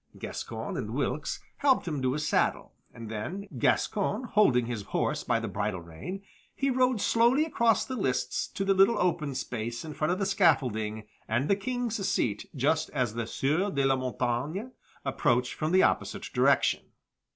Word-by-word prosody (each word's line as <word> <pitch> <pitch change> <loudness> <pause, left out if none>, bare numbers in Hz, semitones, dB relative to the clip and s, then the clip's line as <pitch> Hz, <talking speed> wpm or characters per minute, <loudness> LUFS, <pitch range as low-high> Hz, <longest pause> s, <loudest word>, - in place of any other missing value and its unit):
Gascoyne - - -5
and - - -4
Wilkes - - -2 0.2
helped 270 -9 +3
him 150 -5 -2
to 130 0 +1
his 150 +1 -2
saddle, - - +1 0.2
and 115 -1 -9
then, 155 - -5
Gascoyne 205 - +1
holding 205 - +3
his 115 -3 -3
horse 100 - -1
by - - +1
the - - -4
bridle 100 -4 -2
rein, 85 - -7 0.3
he 275 0 +1
rode 255 -2 +2
slowly 240 +8 +3
across 235 -8 +2
the 260 - -4
lists 135 - -1
to 195 - -4
the 195 - +4
little 195 +4 +5
open 155 -6 0
space 120 +1 -4
in 155 - -6
front 155 +3 0
of 180 - 0
the 195 - 0
scaffolding 110 - +1 0.2
and 120 +6 0
the 200 - +4
King's 230 0 -2
seat 105 -3 -1
just 155 +4 +1
as 125 -4 0
the 115 -1 -3
Sieur 155 - 0
de 140 -7 0
la 135 0 +4
Montaigne 130 - -2 0.4
approached 125 -2 +1
from 155 +1 -2
the 185 +1 +5
opposite - - 0
direction. - - +3
155 Hz, 175 wpm, -29 LUFS, 120-205 Hz, 0.4 s, little